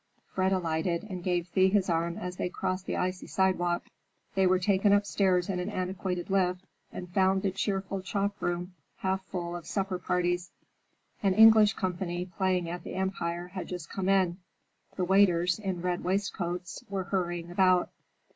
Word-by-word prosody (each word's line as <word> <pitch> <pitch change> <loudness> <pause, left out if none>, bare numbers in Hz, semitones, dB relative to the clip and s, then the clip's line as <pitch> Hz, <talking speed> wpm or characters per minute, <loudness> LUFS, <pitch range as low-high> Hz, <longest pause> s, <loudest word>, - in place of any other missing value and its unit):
Fred 190 0 +1
alighted 170 -1 0
and 180 -1 -5
gave 175 -1 0
Thea 190 +1 +4
his 195 -1 +2
arm 170 0 0
as 180 0 -5
they - - -1
crossed 185 +1 -3
the - - -1
icy 185 0 -2
sidewalk. 175 -2 +1 0.5
They 190 -1 +3
were 185 0 +4
taken 195 +2 +3
upstairs 195 -3 +2
in 185 -2 -2
an 180 +3 -2
antiquated 185 -1 -3
lift 185 -1 +1 0.3
and 180 - -7
found 190 +1 +3
the 195 - +1
cheerful 195 0 -2
chop 200 +1 -2
room 175 +1 -2 0.2
half 190 0 -1
full 175 -2 -4
of 175 - -8
supper 195 -2 -2
parties. 175 0 0 0.7
An 195 -2 +2
English 220 -1 +8
company 180 -2 -2
playing 185 -1 0
at 175 0 -5
the - - -7
Empire 175 -2 -2
had 185 0 -6
just 180 -3 -7
come 190 -1 -2
in. 190 -2 +2 0.6
The 185 - 0
waiters, 180 -1 +4
in 190 -4 -3
red 180 -1 -1
waistcoats, 180 -2 -2
were 195 -1 -2
hurrying 175 -3 -2
about. 185 0 +3
185 Hz, 165 wpm, -29 LUFS, 175-195 Hz, 0.7 s, English